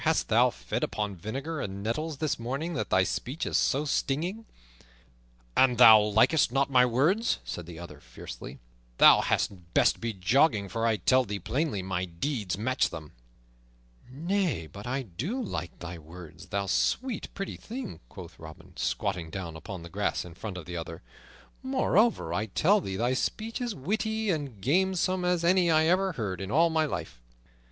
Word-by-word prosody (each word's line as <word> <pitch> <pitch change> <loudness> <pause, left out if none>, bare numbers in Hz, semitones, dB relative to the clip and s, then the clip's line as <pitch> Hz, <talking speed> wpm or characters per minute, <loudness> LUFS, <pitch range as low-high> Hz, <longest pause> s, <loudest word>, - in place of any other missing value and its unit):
Hast - - +1
thou - - +5
fed - - -4
upon 105 -1 -2
vinegar 135 - -5
and 100 0 -5
nettles 150 +7 -2
this 155 -3 -1
morning 135 +9 -3
that 110 - -3
thy 95 - +4
speech 130 - -3
is - - -2
so 145 +3 +2
stinging?" 170 +10 -1 1.1
"An 130 -2 +5
thou 110 -3 +9
likest 115 +7 +3
not 135 +1 +1
my 125 -1 +5
words," 160 - +2
said 85 -2 -6
the 85 -2 -9
other 85 -4 -10
fiercely, - - -10 0.4
"thou - - +8
hadst 90 -3 -2
best - - +3
be 115 0 -1
jogging, 105 - +2
for 115 +2 -1
I 110 -2 +2
tell 130 +4 +3
thee 105 -3 -4
plainly, 115 - -2
my 95 -1 -2
deeds 95 - -3
match 130 +5 +1
them." 75 -3 -9 1.0
"Nay, 170 - -1
but 100 +7 -10
I 130 +2 -2
do 130 - -4
like 85 - -5
thy 85 0 -7
words, 85 +3 -12
thou 100 +1 -2
sweet, 245 - -1
pretty 195 0 -4
thing," 240 -1 -7
quoth - - -11
Robin, 80 -1 -12
squatting 90 -6 -2
down 85 -2 -6
upon 90 +2 -8
the 85 - -9
grass 100 +2 -1
in 90 - -10
front 95 +2 -7
of 85 - -8
the 90 - -7
other. 85 -2 -6 0.6
"Moreover, 235 - +2
I 105 +4 -1
tell 190 - +3
thee 95 - -4
thy 120 +5 +1
speech 225 - -2
is 240 -3 -2
witty 220 +7 -1
and 140 - -4
gamesome 185 +4 +1
as 180 -1 +1
any 175 0 +4
I 160 -1 +4
ever 185 +2 +2
heard 95 - -4
in 95 - -5
all 165 +7 +3
my 160 -1 +2
life." 140 - -5
120 Hz, 175 wpm, -28 LUFS, -, 1.1 s, thou